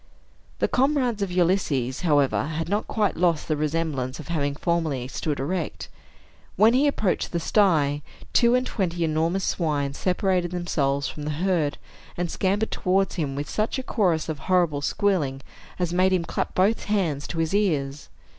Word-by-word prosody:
The - - +1
comrades 255 -5 +1
of 195 -2 -1
Ulysses, 170 -8 +1
however, 145 -7 +2
had 160 +1 -3
not 205 +4 -1
quite 210 -3 0
lost 170 -2 +1
the 155 - +1
remembrance 150 -4 -2
of 155 - -9
having 145 -4 -1
formerly 155 -6 -1
stood 145 +2 -3
erect. 170 +4 -3 0.7
When 220 +4 +5
he 275 +4 +4
approached 215 -9 0
the 170 - -1
sty, 155 -7 +2 0.3
two 235 0 +5
and 250 0 +1
twenty 175 -7 -1
enormous 165 +4 0
swine 145 -6 -1
separated 180 +1 0
themselves 145 -6 -1
from 150 - -7
the 150 - -3 0.2
herd, 165 -6 +1 0.4
and 175 -1 -2
scampered 205 +3 0
towards 190 +1 +1
him, 145 -6 -2
with 145 +1 -3
such 215 +4 -1
a 260 - -3
chorus 180 -10 +1
of 155 -3 -4
horrible 170 -6 +2
squealing 145 -6 0 0.4
as 175 -1 -1
made 185 +1 +3
him 175 -2 +1
clap - - -3
both 200 +5 +2
hands 170 -9 0
to 170 - -5
his 165 +2 0
ears. 150 -9 0
170 Hz, 165 wpm, -25 LUFS, 150-195 Hz, 0.7 s, When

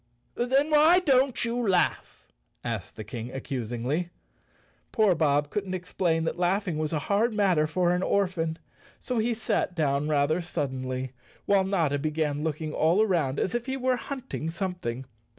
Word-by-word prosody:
"Then 270 +5 +1
why 310 +4 +6
don't 270 -8 +2
you 235 +1 -2
laugh?" 195 -7 0 0.3
asked 115 -6 -4
the 110 - -6
King 115 +2 -6
ac¬ 135 +1 -6
cusingly. 130 +6 -2 0.8
Poor 215 -5 +4
Bob 150 -2 +1
couldn't 195 -3 -2
explain 175 -2 -1
that 165 +2 -2
laughing 180 -2 0
was 155 -1 -1
a 160 - 0
hard 215 +3 +1
matter 185 -7 +3
for 175 +2 +1
an 180 0 +1
orphan, 180 -5 0 0.4
so 250 -3 -2
he 230 +1 +1
sat 215 -5 -1
down 145 -2 0
rather 155 +3 +2
suddenly, 130 -5 -3 0.3
while 200 -1 +4
Notta 165 -7 +1
began 150 -1 -1
looking 155 0 -3
all 170 +7 +3
around 165 -10 0
as 190 - -1
if 240 +1 -2
he 265 0 -2
were 255 -1 +1
hunting 255 - -5
something. 170 -8 -4
175 Hz, 160 wpm, -27 LUFS, 150-210 Hz, 0.8 s, why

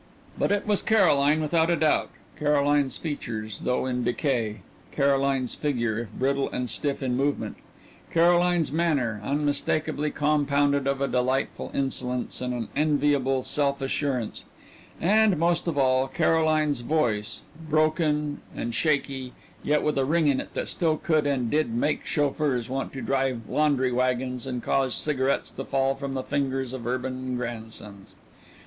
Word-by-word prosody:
But - - 0
it 205 -1 +1
was 210 -2 +1
Caroline 155 -8 +4
without 160 +2 +2
a 170 - +3
doubt: 155 -1 +2 0.3
Caroline's 145 -2 +2
features 110 - -5
though 125 +1 +1
in 125 -1 -1
decay; 120 -4 -1 0.3
Caroline's 140 -2 +1
figure, 120 -7 -1
if 115 -3 -6
brittle 135 +1 0
and 125 0 -3
stiff 140 -1 -2
in 125 -2 0
movement; 140 +2 -1 0.5
Caroline's 175 -1 +3
manner, 140 -10 0
unmistakably 150 +3 -1
compounded 145 -2 +1
of 140 0 0
a 140 - +2
delightful 130 +1 -1
insolence 125 -3 -2
and 125 0 -2
an 120 -2 -4
enviable 145 -3 +2
self 140 -1 0
assurance; 135 -3 -2 0.6
and, 210 +1 +4
most 170 +2 +1
of 160 -4 -1
all, 130 -1 +3
Caroline's 155 -2 +2
voice, 115 -7 0 0.3
broken 155 -1 +1
and 120 0 -3
shaky, 135 -2 -1 0.3
yet 150 0 +1
with 150 -2 +1
a - - +3
ring 160 +3 +2
in 140 -2 +3
it - - -6
that - - -2
still 160 -3 0
could 155 -3 +1
and 125 -5 0
did 155 -4 +1
make 145 +5 0
chauffeurs 145 -4 0
want 135 +1 -3
to 135 - -6
drive 130 -5 -1
laundry 140 -4 +2
wagons 125 +1 -1
and 125 -2 -4
cause 135 -2 +1
cigarettes 140 -3 0
to 135 - -6
fall 135 0 +1
from 135 0 -5
the 130 -1 -2
fingers 135 -2 -2
of 120 -3 -5
urban 130 0 -3
grandsons. 110 -4 -7
140 Hz, 150 wpm, -26 LUFS, 125-150 Hz, 0.6 s, Caroline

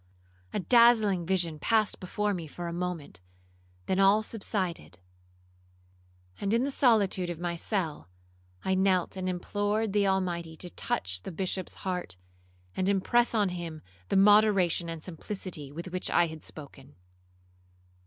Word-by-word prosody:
A - - -1
dazzling 220 -5 +4
vision 175 -5 0
passed 220 +4 +1
before 205 +3 -1
me 170 -4 -5
for 175 +4 -6
a 170 - -4
moment, 170 - -5 0.6
then 190 - 0
all 200 +2 +5
subsided; 190 - -3 1.4
and, 200 +2 +1
in 235 - +2
the 280 - -1
solitude 205 -9 +3
of 175 - -4
my 175 0 -3
cell, 165 - -3 0.6
I 190 - +2
knelt 190 -1 +2
and 185 -1 -2
implored 205 +3 -1
the 205 -1 +3
Almighty 175 -4 -1
to 175 +1 -6
touch 90 0 -2
the - - -7
Bishop's 185 +1 -3
heart, 180 - -3 0.6
and 185 +1 0
impress 235 +5 +2
on 205 -3 +3
him 170 -3 -6 0.3
the - - +2
moderation 195 -4 +4
and 165 -1 -6
simplicity 180 -4 -6
with 170 +4 -7
which 185 0 -2
I 175 - +4
had 160 -1 -8
spoken. 140 -2 -11
185 Hz, 145 wpm, -29 LUFS, 170-205 Hz, 1.4 s, all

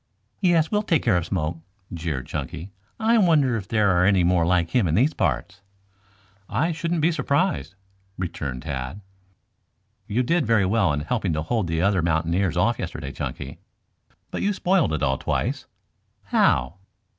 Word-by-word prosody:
"Yes, 170 -4 +2
we'll 210 -1 +2
take 175 -7 +1
care 110 -6 +3
of 85 -1 -2
Smoke," 85 -3 -2 0.3
jeered 80 -6 -3
Chunky. 85 +9 -6 0.3
"I 225 +1 +3
wonder 150 - +3
if 100 -4 -4
there 105 -3 +2
are 90 -1 +3
any 95 -1 +4
more 85 -1 +2
like 85 -2 +1
him 120 -8 +2
in 80 - +1
these 135 - +3
parts?" 85 - -2 0.9
"I 165 +3 0
shouldn't 165 +1 -2
be 165 +3 +3
surprised," 165 - 0 0.4
returned 70 -8 -4
Tad. 70 +4 -5 1.1
"You 115 +4 0
did 165 +6 +1
very 110 -4 +3
well 100 -3 +2
in 75 0 -1
helping 95 +1 -1
to 75 0 -2
hold 110 +1 -1
the 80 +1 -1
other 100 -2 +2
mountaineers 85 +2 0
off 110 +6 +2
yesterday, 80 -6 -5
Chunky. 70 -3 -6 0.7
But - - -3
you 205 - +1
spoiled 185 - +2
it 80 -1 -2
all 65 -2 +1
twice." - - -2 0.6
"How?" 65 +9 +2
95 Hz, 165 wpm, -24 LUFS, -, 1.1 s, any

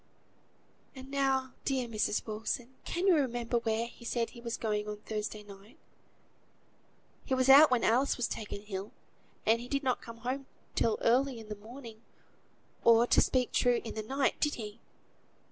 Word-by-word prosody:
"And 265 +1 -10
now, 270 -2 +1
dear 260 -3 0
Mrs. 215 -2 -1
Wilson, 225 +3 -4
can 350 +2 -2
you 385 - +6
remember 240 -4 0
where 225 0 0
he 235 - -13
said 235 -1 -1
he 235 - -12
was 235 -1 -4
going 210 -2 -1
on 210 0 -4
Thursday 215 0 -4
night? 200 +2 -14 1.5
He 265 - 0
was 260 0 +2
out 285 +3 +10
when 250 -2 +2
Alice 255 +5 +3
was 245 - 0
taken 205 -1 -6
ill; 195 -1 -6 0.5
and 230 +2 +3
he 245 - -8
did 275 +2 -1
not 255 -2 0
come 230 0 -10
home 270 +2 -2 0.3
till 225 -2 +1
early 255 +1 +2
in 220 -1 -11
the 210 - -4
morning, 225 +1 -11 0.8
or, 230 0 +6
to - - +4
speak 255 -2 +1
true, 245 -1 +3
in 225 - -6
the 220 - -3
night: 270 +5 0
did 295 -1 +1
he?" 215 -1 -7
235 Hz, 175 wpm, -31 LUFS, 220-260 Hz, 1.5 s, out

